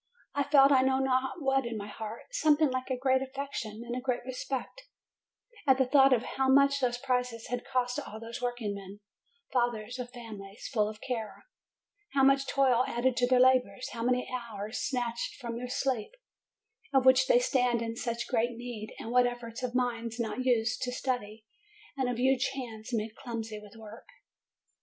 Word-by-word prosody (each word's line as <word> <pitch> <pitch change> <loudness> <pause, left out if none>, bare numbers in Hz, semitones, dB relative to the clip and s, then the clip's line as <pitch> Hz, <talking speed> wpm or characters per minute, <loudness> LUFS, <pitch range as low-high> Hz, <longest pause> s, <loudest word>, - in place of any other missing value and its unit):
I 285 - 0
felt 280 -1 +6
I 265 -2 +6
know 265 0 +2
not 265 +3 0
what 270 0 +2
in 235 -2 -4
my 200 - -5
heart, 215 +2 -7
something 310 - +3
like 255 +1 -3
a 260 - 0
great 260 +1 +2
affection 265 -5 -5
and 240 0 -4
a 250 - -3
great 250 -2 -2
respect, 260 - -4 0.9
at 265 -1 +6
the 265 - +3
thought 270 +1 +6
of 245 -2 +3
how 265 +1 -1
much 280 +1 +5
those 245 -2 +1
prizes 250 -2 -2
had 245 0 -2
cost 255 0 -1
all 220 -6 -8
those 230 +2 -7
workingmen, 205 -5 -4 0.5
fathers 240 -1 0
of 245 -1 -4
families, 220 -5 -9
full 210 -3 +2
of 215 0 -10
care; 230 -4 -5 0.7
how 270 - +3
much 275 0 +4
toil 255 -3 +3
added 240 +1 +1
to 245 - +3
their 255 0 +4
labors, 255 0 +3
how 230 - -6
many 250 +1 +1
hours 220 -3 -4
snatched 240 -3 -2
from 235 -1 -6
their 250 +1 -5
sleep, 255 - -1 0.8
of 265 -2 +3
which 260 0 +6
they - - +6
stand 250 - +2
in 230 0 -4
such 235 0 -3
great 235 -1 0
need, 235 -3 -7
and 225 - -6
what 250 0 +5
efforts 240 0 -6
of 250 -1 -3
minds 235 -2 -1
not 235 +2 -2
used 240 -1 +1
to 250 -1 -1
study, 230 -4 -3 0.5
and 265 -2 0
of 245 - -2
huge 260 +1 +3
hands 225 -5 -7
made 220 -2 -2
clumsy 225 -4 -5
with 210 +1 -14
work 220 0 -12
245 Hz, 185 wpm, -30 LUFS, 230-260 Hz, 0.9 s, felt